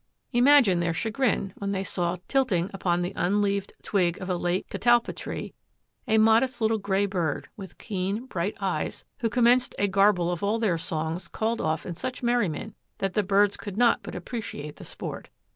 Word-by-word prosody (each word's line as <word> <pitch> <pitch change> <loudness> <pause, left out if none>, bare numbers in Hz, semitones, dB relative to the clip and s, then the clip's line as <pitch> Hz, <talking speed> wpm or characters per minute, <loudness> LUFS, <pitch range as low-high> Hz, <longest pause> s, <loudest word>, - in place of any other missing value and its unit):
Imagine 245 -7 +5
their 170 -1 0
chagrin 220 -3 0
when 200 0 -2
they 190 0 -1
saw 175 -2 -1
tilting 205 -10 +1
upon 175 -2 0
the 180 - -3
unleaved 200 +1 0
twig 180 -4 +1
of 185 0 -4
a - - +1
late 175 +1 -1
catalpa 240 0 +2
tree - - -6 0.5
a 220 -1 +3
modest 225 +3 +4
little 220 -1 +1
gray 200 0 +1
bird 175 -7 -2
with 195 -3 -10
keen, 200 +3 -3
bright 190 -4 -3
eyes, 185 -6 -2
who 230 - 0
commenced 245 +2 +3
a 205 - +2
garble 195 -3 +3
of 175 - -3
all 205 +2 +1
their 200 -8 +1
songs 160 +2 -3
called 225 +5 -2
off 155 -1 -1
in 175 - -4
such 255 +9 -5
merriment 235 -10 0 0.2
that 195 -1 -2
the 210 - +2
birds 200 +1 +3
could 205 -2 -7
not 240 0 +4
but - - -8
appreciate 180 - -6
the - - -10
sport. - - -7
200 Hz, 180 wpm, -26 LUFS, 175-225 Hz, 0.5 s, Imagine